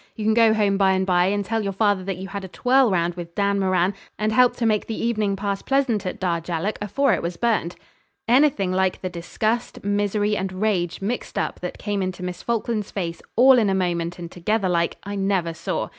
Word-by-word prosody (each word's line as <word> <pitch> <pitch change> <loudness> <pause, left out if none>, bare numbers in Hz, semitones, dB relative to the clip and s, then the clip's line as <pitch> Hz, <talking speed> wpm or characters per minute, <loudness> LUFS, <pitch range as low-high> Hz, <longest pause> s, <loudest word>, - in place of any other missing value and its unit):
You 215 - -4
can 220 - +4
go 225 -1 +5
home 200 -2 +2
by'n 190 -1 +3
by, 180 -1 +3
and 200 +1 0
tell 225 +2 -1
your 195 -1 -2
father 205 -1 +1
that 195 -2 -3
you 190 +1 -7
had 200 0 -5
a - - -6
twirl 250 +6 +3
round 175 -2 +1
with 170 -1 -9
Dan 200 0 +1
Moran, 185 0 +2 0.2
and 215 0 0
helped 250 +2 +4
to 240 - -1
make 215 -2 +1
the 225 - -4
evening 215 -4 0
pass 200 0 -3
pleasant 250 -8 0
at - - -5
Darjallook 170 +2 -2
afore 255 +5 +1
it - - 0
was 170 0 -4
burned.' 220 -7 0 0.5
Anything 245 -7 +3
like 185 0 0
the 185 - -3
disgust, 215 +7 -3
misery, 205 +1 0
and 190 -1 -3
rage 185 -3 -1
mixed 235 +5 -3
up - - -2
that 180 - -5
came 205 -2 -2
into 185 -1 -4
Miss 180 -1 -5
Falkland's 230 -2 -2
face 170 -4 -4
all 255 +2 +7
in 215 -3 +2
a 190 - +1
moment 175 -2 -1
and 170 -1 -8
together 195 +3 0
like, 170 -1 0
I 200 - -6
never 195 -4 0
saw. 160 - -3
200 Hz, 220 wpm, -23 LUFS, 180-215 Hz, 0.5 s, all